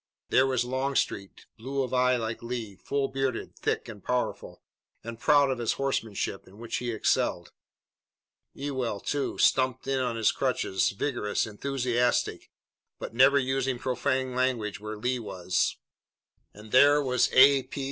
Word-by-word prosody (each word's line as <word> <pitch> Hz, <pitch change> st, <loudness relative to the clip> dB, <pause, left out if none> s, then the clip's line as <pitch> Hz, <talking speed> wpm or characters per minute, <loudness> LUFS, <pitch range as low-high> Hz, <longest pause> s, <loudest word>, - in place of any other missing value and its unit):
There 130 Hz, -, +4 dB
was 130 Hz, -2 st, 0 dB
Longstreet, 130 Hz, -6 st, -2 dB
blue 135 Hz, +3 st, -2 dB
of 130 Hz, 0 st, -5 dB
eye 125 Hz, 0 st, +3 dB
like 115 Hz, -1 st, -4 dB
Lee, 115 Hz, -4 st, -5 dB
full 140 Hz, +7 st, -2 dB
bearded, 135 Hz, -3 st, -3 dB
thick -, -, -2 dB
and 105 Hz, -4 st, -10 dB
powerful, 125 Hz, -1 st, -3 dB, 0.4 s
and 115 Hz, 0 st, -7 dB
proud 145 Hz, 0 st, +4 dB
of 130 Hz, -, -3 dB
his 120 Hz, -, 0 dB
horsemanship, 115 Hz, -7 st, -3 dB
in 95 Hz, +2 st, -16 dB
which 115 Hz, 0 st, -4 dB
he 120 Hz, -, -3 dB
excelled. 110 Hz, -2 st, 0 dB, 1.0 s
Ewell, 130 Hz, -7 st, -3 dB
too, 145 Hz, +6 st, -2 dB
stumped 130 Hz, -1 st, +2 dB
in 135 Hz, 0 st, 0 dB
on 125 Hz, -2 st, -1 dB
his 115 Hz, -2 st, +3 dB
crutches, 125 Hz, -7 st, 0 dB
vigorous, 105 Hz, 0 st, -1 dB
enthusiastic, 125 Hz, +2 st, -1 dB, 0.5 s
but -, -, -7 dB
never 130 Hz, +4 st, +5 dB
using 135 Hz, -1 st, 0 dB
profane 130 Hz, +1 st, -1 dB
language 125 Hz, -6 st, -1 dB
where 105 Hz, 0 st, -6 dB
Lee 125 Hz, +3 st, -1 dB
was. 95 Hz, -4 st, -1 dB, 0.7 s
And 105 Hz, +1 st, -14 dB
there 145 Hz, +3 st, +6 dB
was 130 Hz, -3 st, +1 dB
A. 135 Hz, +1 st, +7 dB
P. 135 Hz, -, -9 dB
125 Hz, 145 wpm, -27 LUFS, 115-135 Hz, 1.0 s, A